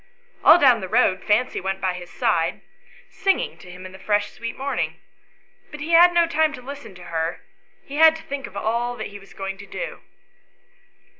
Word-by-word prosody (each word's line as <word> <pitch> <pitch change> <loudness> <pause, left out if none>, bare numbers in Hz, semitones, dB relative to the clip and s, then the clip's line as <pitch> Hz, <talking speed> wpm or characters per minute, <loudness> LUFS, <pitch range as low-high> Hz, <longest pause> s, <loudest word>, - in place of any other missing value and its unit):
All 320 - +9
down 255 -8 +5
the 190 - -4
road 195 -5 +2
Fancy 220 +5 +1
went 190 +1 -3
by 185 -1 0
his 175 -1 -9
side, - - 0 0.5
singing 390 -1 0
to 180 - -13
him 180 +1 -10
in 185 - -9
the 190 - -13
fresh 205 +1 0
sweet 230 0 -7
morning; 275 +1 -2 0.7
but 300 - -9
he 305 +3 -4
had 345 +1 +8
no 345 -1 +4
time 315 -2 +1
to 250 - -8
listen 280 -6 -9
to 180 - -12
her, 165 -1 -3 0.4
he 280 - -7
had 320 0 +7
to 320 - -10
think 275 -1 -5
of 200 - -10
all 240 +3 -1
he 205 -2 -7
was 195 - -17
going 195 0 -5
to 200 - -11
do. - - -6
230 Hz, 200 wpm, -23 LUFS, 190-300 Hz, 0.7 s, All